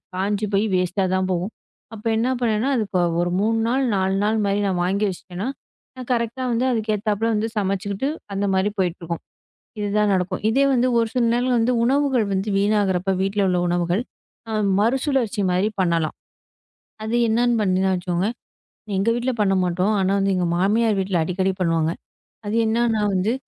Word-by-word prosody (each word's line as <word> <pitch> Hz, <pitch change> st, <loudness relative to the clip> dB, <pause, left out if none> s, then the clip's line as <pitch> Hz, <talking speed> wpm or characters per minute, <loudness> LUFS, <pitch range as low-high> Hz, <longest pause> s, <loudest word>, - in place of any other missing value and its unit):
காஞ்சு 200 Hz, +3 st, -1 dB
போயி 200 Hz, +2 st, +3 dB
வேஸ்ட்டாதான் 185 Hz, +1 st, 0 dB
போகும். 180 Hz, +4 st, -2 dB, 0.4 s
அப்போ 225 Hz, 0 st, -6 dB
என்ன 235 Hz, +3 st, +1 dB
பண்ணனா, 225 Hz, +1 st, +1 dB
அதுக்கு 210 Hz, -5 st, -1 dB
ஒ -, -, +3 dB, 0.2 s
ஒரு 175 Hz, 0 st, -1 dB
3 225 Hz, +3 st, +1 dB
நாள், 260 Hz, +3 st, +1 dB
4 190 Hz, 0 st, +1 dB
நாள் 215 Hz, +1 st, +1 dB
மாரி 200 Hz, 0 st, +1 dB
நான் 185 Hz, -2 st, -1 dB
வாங்கி 200 Hz, +3 st, +1 dB
வச்சிட்டேன்னா, 185 Hz, +3 st, -6 dB, 0.6 s
கரெக்ட்டா 235 Hz, +1 st, -1 dB
வந்து 235 Hz, +2 st, +1 dB
அதுக்கு 220 Hz, -2 st, 0 dB
ஏத்தாப்புல 215 Hz, +1 st, -1 dB
வந்து 215 Hz, +1 st, 0 dB
சமைச்சுக்கிட்டு, 200 Hz, +5 st, -1 dB, 0.2 s
அந்த 200 Hz, +1 st, -1 dB
மாரி 190 Hz, +2 st, +2 dB
போயிட்டு 180 Hz, -2 st, 0 dB
இருக்கும். 170 Hz, 0 st, -4 dB, 0.6 s
இதுதான் 210 Hz, 0 st, +1 dB
நடக்கும். 180 Hz, -1 st, -1 dB
இதே 270 Hz, +5 st, +3 dB
வந்து 250 Hz, 0 st, +2 dB
ஒரு 230 Hz, -, +1 dB
சில 250 Hz, -, +1 dB
நேரங்கள் 245 Hz, +1 st, +1 dB
வந்து 235 Hz, +2 st, +2 dB
உணவுகள் 265 Hz, -2 st, +2 dB
வந்து 195 Hz, +2 st, -1 dB
வீணாகுறப்ப, 200 Hz, -2 st, +1 dB
வீட்டுல 195 Hz, +1 st, 0 dB
உள்ள 180 Hz, -1 st, +1 dB
உணவுகள 175 Hz, +2 st, 0 dB, 0.8 s
மறுசுழற்சி 245 Hz, -1 st, +1 dB
மாரி 185 Hz, +3 st, +2 dB
பண்ணலாம். 170 Hz, -3 st, 0 dB, 0.9 s
அது 220 Hz, +2 st, -1 dB
என்னன்னு 240 Hz, +2 st, +2 dB
பண்ணுவேனா 190 Hz, -1 st, +1 dB
வச்சுக்கோங்களேன், 180 Hz, +5 st, -2 dB, 0.6 s
எங்க 195 Hz, +4 st, 0 dB
வீட்டுல 245 Hz, +2 st, -1 dB
பண்ண 195 Hz, -1 st, +2 dB
மாட்டோம். 180 Hz, +4 st, +1 dB
ஆனா, 190 Hz, +1 st, +1 dB, 0.2 s
எங்க 180 Hz, -1 st, 0 dB
மாமியார் 210 Hz, +3 st, +2 dB
வீட்டுல 190 Hz, -2 st, 0 dB
அடிக்கடி 185 Hz, +3 st, 0 dB
பண்ணுவாங்க. 165 Hz, -2 st, +1 dB, 0.5 s
அது 205 Hz, +2 st, -2 dB
என்னன்னா 225 Hz, -1 st, +1 dB
வந்து 195 Hz, +5 st, +1 dB
205 Hz, 160 wpm, -22 LUFS, 185-225 Hz, 0.9 s, போயி